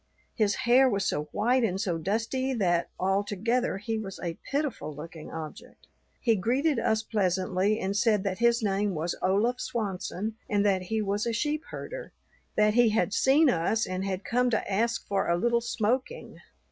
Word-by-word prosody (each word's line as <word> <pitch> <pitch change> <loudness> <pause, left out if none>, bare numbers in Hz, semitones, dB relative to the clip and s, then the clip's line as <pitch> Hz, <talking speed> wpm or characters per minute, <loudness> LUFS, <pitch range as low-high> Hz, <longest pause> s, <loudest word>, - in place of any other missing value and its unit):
His 210 -3 +1
hair 255 +2 +6
was 200 -4 0
so 150 -4 -1
white 240 - +1
and 190 -4 0
so 180 -5 -1
dusty 230 +9 -1
that 175 -6 +1
altogether 205 +4 0
he 220 +2 -3
was 195 -3 -7
a 170 -2 -5
pitiful 275 - -2
looking 160 +1 -9
object. 160 -1 -9 0.3
He 230 -3 +3
greeted 255 - +1
us 220 -1 +1
pleasantly, 190 0 0
and 195 +1 -2
said 210 -1 +2
that 195 -1 -2
his 235 0 +3
name 200 -1 0
was 160 +3 -1
Olaf 215 +7 +1
Swanson 210 0 -3
and 205 -1 +2
that 195 -2 +2
he 215 +4 -2
was 205 +2 -1
a 230 - 0
sheep 295 +6 -1
herder; - - -7 0.4
that 210 0 +4
he 240 0 +5
had 210 -2 +1
seen 280 +8 +4
us 215 +2 +1
and 185 0 -3
had 195 0 -3
come 250 +1 +2
to 225 -3 -1
ask 230 +4 0
for 200 -1 0
a 170 - +3
little 235 +5 +2
smoking. 245 - -2
210 Hz, 175 wpm, -28 LUFS, 190-235 Hz, 0.4 s, hair